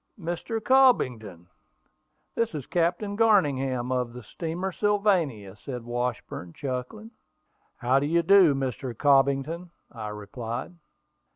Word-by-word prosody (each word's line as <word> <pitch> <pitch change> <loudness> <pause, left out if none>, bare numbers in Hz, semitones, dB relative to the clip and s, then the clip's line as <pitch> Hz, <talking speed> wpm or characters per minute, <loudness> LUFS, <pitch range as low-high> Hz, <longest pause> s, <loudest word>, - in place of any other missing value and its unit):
"Mr. 175 +6 -3
Cobbington, 125 - +2 0.9
this 230 -4 -1
is 140 -4 -5
Captain 175 +4 0
Garningham, 135 - +2
of 125 -2 -1
the 125 -1 -9
steamer 170 - -4
Sylvania," 180 - 0
said 125 +3 -7
Washburn, 120 -7 -4
chuckling. 140 - -5 0.6
"How 130 +1 +2
do 145 - -1
you 170 +2 +2
do, 185 -7 +6
Mr. 130 -2 -3
Cobbington," 140 +4 +2 0.2
I 110 -3 -6
replied. 115 - -6
140 Hz, 110 wpm, -26 LUFS, 120-180 Hz, 0.9 s, do